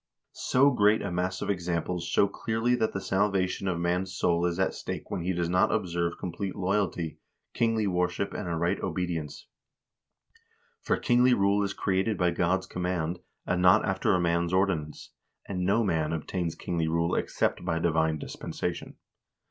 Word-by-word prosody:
"So 140 +3 +3
great 105 -1 +3
a - - -3
mass 90 +1 -2
of - - 0
examples 90 -1 -2
show 95 +4 +3
clearly 115 +4 -1
that 110 -3 +1
the 95 - -3
salvation 95 -1 0
of 90 -2 0
man's 90 +2 0
soul 85 -2 +1
is 85 -1 -2
at 95 - +1
stake - - -6
when - - -2
he 90 +2 -1
does 85 -2 -1
not 90 +2 +3
observe 85 -5 -1
complete 95 +2 -4
loyalty, 95 -4 -1 0.3
kingly 115 -2 +1
worship, 90 +1 -1
and - - -4
a 85 - -1
right 85 +4 0
obedience; 85 -4 -3 1.4
for - - +1
kingly 125 0 +4
rule 100 0 +2
is 100 0 -2
created 100 +2 0
by 90 -1 +2
God's 90 +2 +1
command, 90 -2 -2 0.3
and 90 0 0
not 90 0 +6
after 95 +1 +1
man's 85 0 +1
ordinance, 90 -6 -1 0.4
and 90 -2 -2
no 110 +4 +3
man 80 -6 0
obtains 85 +1 -3
kingly 85 -2 -2
rule 85 +2 0
except - - 0
by 85 -2 -1
divine 80 -1 +1
dispensation. - - -5
90 Hz, 165 wpm, -28 LUFS, 85-100 Hz, 1.4 s, not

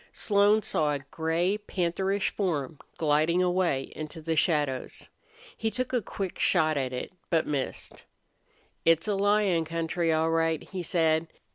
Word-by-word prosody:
Slone 205 +1 +3
saw 150 -4 +1
a 145 - -2
gray, 170 +5 0
pantherish 190 0 -1
form 160 -7 -2 0.2
gliding 155 +3 +2
away 175 -7 0
into 155 +2 -7
the 160 +1 -2
shadows. 150 -5 0 0.5
He 225 - -1
took 255 +3 -3
a 245 - +2
quick 195 -2 -5
shot 155 -4 +3
at 130 -3 -1
it, 125 +7 -5 0.2
but 165 -2 +2
missed. 140 -3 -4 0.8
"It's 165 +3 +3
a 210 - +1
lion 200 -3 +2
country, 165 +1 -1
all 160 +1 +2
right," 165 -1 +1
he 190 -2 -5
said. 165 -1 +1
165 Hz, 145 wpm, -28 LUFS, 155-190 Hz, 0.8 s, Slone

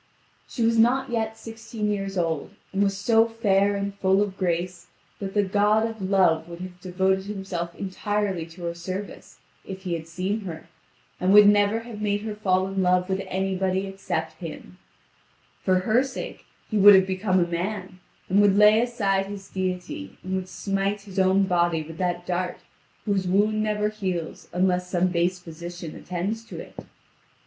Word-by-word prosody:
She 235 - -3
was 230 0 +3
not 255 +3 +3
yet 220 -1 -1
sixteen 225 -1 -4
years 195 -1 -3
old, 165 +2 -1 0.2
and 195 - +1
was 195 -1 +1
so 225 +2 +4
fair 205 -3 +2
and 200 0 -2
full 195 0 +2
of 200 -2 -5
grace 175 -1 -2 0.3
that 195 0 -5
the 205 - +4
god 210 +3 +3
of 225 -2 -8
Love 185 -4 +3
would 170 0 -8
have 180 -1 -9
devoted 190 +1 0
himself 190 -4 -4
entirely 195 -2 -2
to 170 +2 -12
her 170 0 -2
service, 185 +4 -7 0.3
if 190 0 -8
he 180 -3 -2
had 165 -1 -4
seen 185 +6 -2
her, 165 -2 -7 0.5
and 185 +1 +2
would 210 0 +9
never 205 +2 +4
have 225 -2 -9
made 205 -1 0
her 215 0 -4
fall 190 -3 +1
in 195 0 -2
love 180 0 +2
with 190 0 0
anybody 190 0 -1
except 180 -5 -4
himself. 165 0 -8 0.9
For 185 -1 +3
her 220 +6 +3
sake 265 -1 -7 0.2
he 215 - 0
would 205 0 +10
have 190 0 +5
become 190 0 +1
a 175 - +3
man, 185 +2 -4 0.3
and 195 +3 +4
would 200 -1 +4
lay 210 +1 +7
aside 200 -5 0
his 200 -1 -8
deity, 180 - -4
and 185 +1 -4
would 185 -1 -2
smite 195 +1 -1
his 195 -1 -5
own 190 +1 +4
body 175 -3 +1
with 160 +2 -10
that 175 -1 -1
dart 180 0 -2 0.5
whose 195 -3 0
wound 210 +3 +2
never 210 -1 0
heals 185 -6 -4
unless 180 0 +1
some 180 0 +2
base 175 +1 +1
physician 170 -1 -8
attends 195 +6 -3
to - - -8
it. - - -10
190 Hz, 175 wpm, -25 LUFS, 180-205 Hz, 0.9 s, would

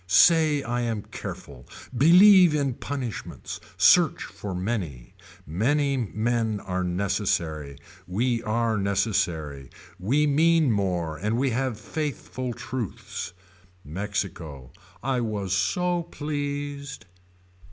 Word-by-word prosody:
Say 155 - +5
I 120 0 -1
am 115 -4 -2
careful. 65 -3 -8 0.3
Believe 180 - +7
in 140 -3 0
punishments. 130 -3 -5 0.2
Search - - +5
for 100 -3 -6
many. 90 - -3 0.3
Many 140 - +1
men 115 -2 -1
are 95 -1 -3
necessary. 85 -6 -1 0.3
We 115 +6 0
are 115 -1 0
necessary. 90 - -1 0.3
We 135 +11 +2
mean 155 0 +4
more 90 -6 -1
and 105 +3 -1
we 135 +1 +1
have 125 -2 -1
faithful 130 -1 -4
truths. 120 -7 -5 0.5
Mexico. 80 - -4 0.3
I 130 -1 0
was 105 -4 -2
so 175 - +1
pleased. 145 -3 -5
115 Hz, 100 wpm, -26 LUFS, 95-140 Hz, 0.5 s, Believe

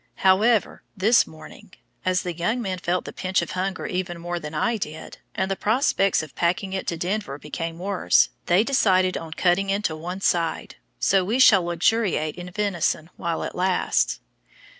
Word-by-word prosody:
However, 210 +4 +3 0.2
this 220 +5 +4
morning, 155 +3 -14 0.3
as 185 0 +1
the 180 - -3
young 175 +9 -1
men 190 -5 -3
felt 180 0 -1
the - - -7
pinch 185 0 0
of - - -7
hunger 185 +1 -3
even 180 -1 -3
more 175 +1 -4
than 150 -1 -7
I 235 +7 +1
did, 160 -5 -7 0.2
and 190 - -1
the - - +1
prospects 210 - +1
of 150 -5 -11
packing 185 - -1
it 190 - -3
to 170 - -2
Denver 180 -3 -3
became 165 +3 -5
worse, 190 +1 +2 0.2
they 180 +4 +4
decided 185 -8 +2
on 160 -1 -5
cutting 185 +4 +1
into 195 -5 0
one 180 +4 -6
side, 170 -3 -1 0.2
so 195 - +3
we 215 +7 0
shall 220 -7 +7
luxuriate 170 -2 0
in 180 0 -8
venison 175 -4 -1
while 170 -2 -3
it - - -5
lasts. 185 0 +1
185 Hz, 175 wpm, -24 LUFS, 170-195 Hz, 0.3 s, shall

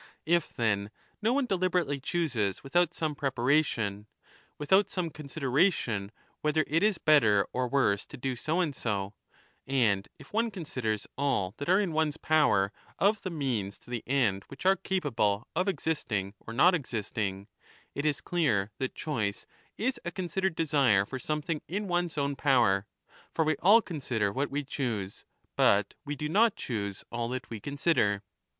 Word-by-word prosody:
If 170 0 +2
then, 100 -3 0 0.3
no 220 +2 +2
one 275 +1 +2
deliberately 180 - 0
chooses 130 - -1
without 175 +5 +1
some 155 -2 -1
preparation, 125 -6 0 0.5
without 190 +7 +3
some 175 -3 -2
considera 140 -3 -5
15 200 - +4
tion 105 -7 -3 0.3
whether 155 +1 +2
it 160 +4 +1
is 210 -2 +3
better 110 -10 +4
or 125 0 0
worse 120 -7 +1
to 145 - -10
do 130 0 -2
so 160 +8 0
and 150 -6 -1
so, 100 -4 -2 0.5
and 115 -8 +2
if - - -15
one 230 +2 +2
considers 130 - -3
all 125 -10 0
that 145 - -4
are 185 +2 +5
in 195 -5 0
one's 155 -1 0
power 145 -13 +3 0.2
of 205 +2 +2
the 185 - -4
means 125 - -2
to - - -16
the 120 -2 -3
end 120 -8 +1
w^hich 140 +5 -10
are 190 +1 +6
capable 135 - 0
of 185 +4 +1
existing 140 - -1
or - - -10
not 155 +11 +5
existing, 105 - -3 0.5
it 145 - -3
is 150 -2 0
clear 110 - +1
that 130 - -3
choice 110 -10 -2 0.3
is 250 +5 -1
a 175 - -2
considered 185 0 -2
desire 140 -12 +3
for 130 +5 -6
something 150 +3 -2
in 200 +4 -3
one's 175 -3 -1
own 140 -1 0
power; 120 -9 +3 0.4
for 160 - +1
we 155 0 +2
all 215 +6 +6
consider 125 - -1
what 140 +7 -1
we 145 +1 -2
choose, 115 -8 -4 0.3
but 100 0 +3
we 145 +1 -3
do 150 +2 -3
not 220 +8 +4
choose 100 -5 -4
all 115 0 -2
that 130 -1 -5
we 115 - -5
consider. 140 -7 +1
140 Hz, 170 wpm, -29 LUFS, 110-165 Hz, 0.5 s, are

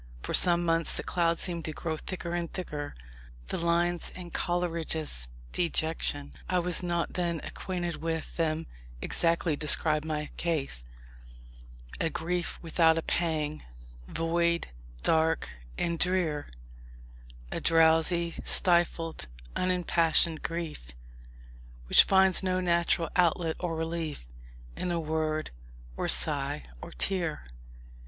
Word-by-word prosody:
For - - -4
some 175 -1 +7
months 165 0 +1
the - - -3
cloud 170 -1 +1
seemed 170 -2 -2
to 155 - -3
grow 160 +1 -3
thicker 170 +1 -5
and 170 -1 -3
thicker. 150 -6 -5 0.5
The - - -1
lines 170 +1 +1
in 175 -2 -10
Coleridge's 165 - -2 0.2
Dejection 160 -4 +1 0.2
I 185 - +2
was 180 0 0
not 170 -1 -2
then 170 -2 -1
acquainted 175 -3 -4
with 160 -1 -4
them 160 -1 -1 0.3
exactly 165 - +1
describe 150 0 +2
my 150 -1 -4
case: 140 - 0 1.1
"A 165 - +1
grief 175 +2 -3
without 165 0 +3
a 165 - -1
pang, 155 -3 -1 0.4
void, 170 +1 0 0.3
dark 160 0 +2 0.3
and 170 -1 -1
drear, 175 -5 0 1.0
A - - -3
drowsy, 165 +1 +3
stifled, 170 - +2 0.3
unimpassioned 170 -3 +2
grief, 165 - -5 0.9
Which - - +7
finds 190 -1 +6
no 185 -1 0
natural 170 -2 +1
outlet 170 -2 +2
or 175 -2 -2
relief 160 - -4 0.5
In 175 - -2
word, 155 -1 -2 0.4
or - - -2
sigh, - - +3 0.2
or - - -8
tear." 175 - -2
165 Hz, 115 wpm, -29 LUFS, 160-175 Hz, 1.1 s, some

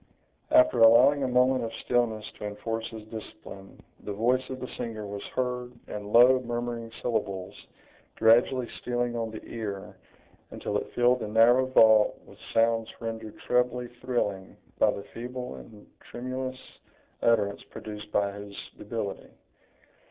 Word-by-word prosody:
After 315 0 +5
allowing 125 +6 +7
a 135 - +1
moment 125 +1 +3
of 115 - -3
stillness 115 -3 +1
to - - -5
enforce 115 +2 -4
his 110 -1 -9
discipline, 95 -3 -10 0.2
the - - -5
voice 120 +5 +2
of 130 -1 -5
the 125 - -5
singer 110 -2 -5
was 100 0 -6
heard, 125 -1 -2
in 105 0 -6
low, 125 +3 +7
murmuring 120 -1 -4
syllables, 100 -5 -2 0.6
gradually 120 +3 +4
stealing 120 -1 -1
on 115 -1 -2
the 110 - -9
ear, 105 -4 -6 0.5
until - - -5
it - - -5
filled 125 +1 +4
the - - -4
narrow 120 +4 +5
vault 110 -4 +5
with - - -17
sounds 115 0 +2
rendered 115 -2 -6
trebly 125 0 +1
thrilling 105 -7 -2 0.2
by - - +5
the 100 - -3
feeble 125 +1 -6
and 105 -2 -13 0.2
tremulous 130 +1 -4 0.6
utterance 105 -4 +2
produced 105 -1 -9
by 100 -1 +1
his 100 0 -9 0.2
debility. - - -5
115 Hz, 140 wpm, -28 LUFS, 105-125 Hz, 0.6 s, allowing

